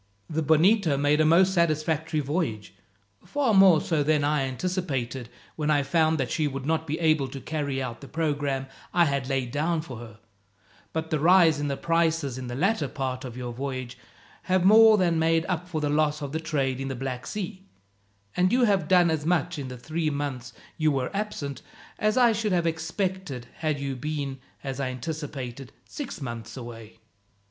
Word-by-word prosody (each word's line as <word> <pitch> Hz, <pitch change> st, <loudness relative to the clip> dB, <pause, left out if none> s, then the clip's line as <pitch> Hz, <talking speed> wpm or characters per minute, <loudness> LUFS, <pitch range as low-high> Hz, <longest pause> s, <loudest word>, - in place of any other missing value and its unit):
The 160 Hz, 0 st, -2 dB
Bonito 160 Hz, +1 st, +4 dB
made 145 Hz, +2 st, +3 dB
a -, -, +4 dB
most 185 Hz, +4 st, +5 dB
satisfactory 160 Hz, -2 st, +1 dB
voyage, 140 Hz, -, -2 dB, 0.5 s
far 280 Hz, -6 st, 0 dB
more 190 Hz, -5 st, +7 dB
so 160 Hz, -2 st, 0 dB
than 150 Hz, 0 st, +2 dB
I 145 Hz, -2 st, +1 dB
anticipated, 130 Hz, -6 st, -3 dB, 0.3 s
when 155 Hz, -1 st, -1 dB
I 145 Hz, -2 st, +3 dB
found 160 Hz, +2 st, +2 dB
that 135 Hz, -4 st, -2 dB
she 155 Hz, -, +1 dB
would 135 Hz, -1 st, -5 dB
not 160 Hz, +1 st, 0 dB
be 155 Hz, +2 st, -2 dB
able 155 Hz, -4 st, +2 dB
to 135 Hz, +1 st, -7 dB
carry 140 Hz, -2 st, -3 dB
out 120 Hz, -2 st, -6 dB
the 140 Hz, -, -9 dB
programme 145 Hz, -4 st, -1 dB, 0.3 s
I 175 Hz, -1 st, +6 dB
had 140 Hz, -3 st, -1 dB
laid 130 Hz, -3 st, -1 dB
down 160 Hz, +4 st, 0 dB
for 135 Hz, -7 st, -8 dB
her; 110 Hz, -3 st, -11 dB, 0.7 s
but 160 Hz, 0 st, -4 dB
the 155 Hz, -, +1 dB
rise 165 Hz, -1 st, +5 dB
in 145 Hz, -, -1 dB
the 140 Hz, -1 st, -2 dB
prices 165 Hz, -5 st, 0 dB
in 130 Hz, -, -6 dB
the 120 Hz, -, -5 dB
latter 180 Hz, -, +1 dB
part 130 Hz, -1 st, -4 dB
of 125 Hz, -2 st, -7 dB
your 125 Hz, -1 st, -5 dB
voyage 130 Hz, -1 st, -5 dB, 0.5 s
have 185 Hz, -1 st, +3 dB
more 220 Hz, +2 st, +8 dB
than 170 Hz, -4 st, +2 dB
made 165 Hz, 0 st, +2 dB
up 180 Hz, -1 st, -2 dB
for 160 Hz, -3 st, -2 dB
the 150 Hz, -, 0 dB
loss 150 Hz, 0 st, +1 dB
of 140 Hz, -, -4 dB
the 160 Hz, -, -2 dB
trade 135 Hz, -5 st, -1 dB
in 135 Hz, -, -3 dB
the 135 Hz, -, -3 dB
Black 130 Hz, 0 st, -5 dB
Sea; 190 Hz, -2 st, -5 dB, 0.7 s
and 180 Hz, +1 st, +3 dB
you 250 Hz, 0 st, +3 dB
have 195 Hz, -8 st, +2 dB
done 180 Hz, -2 st, +5 dB
as 155 Hz, -2 st, -1 dB
much 160 Hz, -2 st, 0 dB
in 135 Hz, -, -5 dB
the 125 Hz, 0 st, -7 dB
three 155 Hz, +5 st, -2 dB
months 140 Hz, -4 st, -4 dB, 0.3 s
you 155 Hz, -1 st, +3 dB
were 135 Hz, +5 st, -2 dB
absent, 145 Hz, -, -4 dB, 0.4 s
as 215 Hz, +3 st, +1 dB
I 245 Hz, -2 st, +6 dB
should 215 Hz, -2 st, 0 dB
have 175 Hz, -2 st, +1 dB
expected 165 Hz, -, -2 dB
had 155 Hz, -3 st, -1 dB
you 140 Hz, -1 st, -3 dB
been, 140 Hz, 0 st, -4 dB, 0.2 s
as 135 Hz, -1 st, -4 dB
I 135 Hz, -2 st, -1 dB
anticipated, 135 Hz, -2 st, -6 dB
six 275 Hz, -, -7 dB
months 115 Hz, -3 st, -6 dB
away. 115 Hz, -3 st, -9 dB
150 Hz, 190 wpm, -26 LUFS, 135-170 Hz, 0.7 s, more